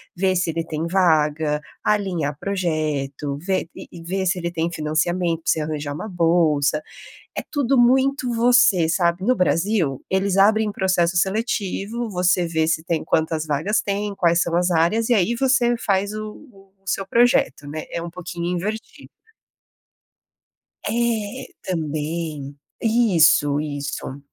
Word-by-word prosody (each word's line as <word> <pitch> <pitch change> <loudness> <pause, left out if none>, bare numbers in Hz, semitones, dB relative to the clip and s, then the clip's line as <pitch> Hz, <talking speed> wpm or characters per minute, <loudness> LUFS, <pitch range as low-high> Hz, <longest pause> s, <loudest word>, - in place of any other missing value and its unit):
ver 185 0 +1
se 175 -2 0
ele 165 0 -2
tem 160 +1 -3
vaga, 155 -4 +2 0.2
alinhar 180 -9 0
projeto, 155 -7 -2
ver 185 -2 -1
e-e 170 - -11
ver 190 +2 -2
se 180 0 +1
ele 170 0 -2
tem 165 0 -2
financiamento 165 +2 -1
pra - - +2
você 160 - 0
arranjar 150 -1 -3
uma 210 +9 -6
bolsa, 165 -5 +2 0.6
é - - -1
tudo 275 -3 +1
muito 260 +1 +3
você, 230 -8 +4
sabe. 170 +2 +1
No 255 +1 +2
Brasil, 175 -6 0
eles 190 0 +1
abrem 210 +1 +3
processo 185 -3 +1
seletivo, 215 +3 -1
você 180 -1 +1
vê 160 -1 0
se 160 0 0
tem 165 -2 -2
quantas 160 0 0
vagas 155 +9 0
tem, 205 0 -2
quais 170 0 +3
são 170 0 -1
as 180 0 +2
áreas 190 +8 +2
e 240 - +4
aí 215 +4 +1
você 250 -2 +2
faz 200 -1 0
o 215 0 -5 0.2
o 195 -2 -21
o 195 - -13
seu 195 - -1
projeto 235 - +2
né. 155 +1 -5
É 170 - -2
pouquinho 175 -1 -6
invertido. 200 +6 -4 1.8
É, 225 -2 -1 0.2
também. 155 -3 -4 0.2
Isso, 175 -11 +4
isso. 145 -2 -5
175 Hz, 145 wpm, -22 LUFS, 160-205 Hz, 1.8 s, você